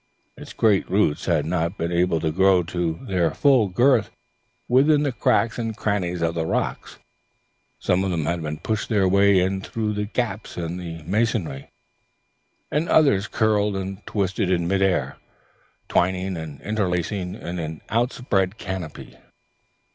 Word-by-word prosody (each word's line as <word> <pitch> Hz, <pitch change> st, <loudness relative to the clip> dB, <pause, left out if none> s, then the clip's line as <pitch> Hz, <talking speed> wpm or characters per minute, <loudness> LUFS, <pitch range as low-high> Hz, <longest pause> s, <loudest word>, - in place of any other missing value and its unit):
Its -, -, -11 dB
great 105 Hz, -4 st, +2 dB
roots 95 Hz, -6 st, +1 dB
had 80 Hz, -5 st, +1 dB
not 85 Hz, +3 st, -1 dB
been 85 Hz, +1 st, -2 dB
able 85 Hz, -1 st, +2 dB
to 80 Hz, 0 st, -1 dB
grow 95 Hz, +1 st, +4 dB
to 85 Hz, -1 st, -2 dB
their 90 Hz, -4 st, +1 dB
full 130 Hz, -7 st, +4 dB
girth 115 Hz, +2 st, +3 dB, 0.6 s
within 145 Hz, +4 st, +4 dB
the 145 Hz, -, 0 dB
cracks 115 Hz, +1 st, +1 dB
and 115 Hz, -2 st, -3 dB
crannies 90 Hz, -5 st, -1 dB
of 85 Hz, 0 st, +1 dB
the 85 Hz, -1 st, -1 dB
rocks; 80 Hz, -, -3 dB, 0.8 s
some 90 Hz, +1 st, +1 dB
of 95 Hz, -, -1 dB
them 85 Hz, -4 st, -1 dB
had 80 Hz, -2 st, -3 dB
pushed 110 Hz, -1 st, -2 dB
their 100 Hz, -4 st, +3 dB
way 100 Hz, +1 st, +4 dB
in 95 Hz, +1 st, 0 dB
through 110 Hz, +1 st, -3 dB
the 105 Hz, 0 st, -2 dB
gaps 110 Hz, -1 st, -3 dB
in 85 Hz, 0 st, -3 dB
the 85 Hz, -3 st, -7 dB
masonry, 95 Hz, -, -1 dB, 1.0 s
and 155 Hz, +3 st, 0 dB
the -, -, -3 dB
others 135 Hz, -11 st, +4 dB
curled 105 Hz, -2 st, +1 dB
and 95 Hz, +1 st, -5 dB
twisted 95 Hz, -1 st, -1 dB
in 85 Hz, -2 st, +1 dB
mid 95 Hz, +1 st, +1 dB
air, 95 Hz, -3 st, +1 dB, 0.7 s
twining 95 Hz, +1 st, 0 dB
and 80 Hz, -4 st, -7 dB
interlacing 95 Hz, -2 st, -2 dB
in 90 Hz, +1 st, -6 dB
an 80 Hz, -1 st, -5 dB
outspread 110 Hz, -4 st, 0 dB
canopy. 95 Hz, -7 st, -7 dB
95 Hz, 155 wpm, -23 LUFS, 85-105 Hz, 1.0 s, grow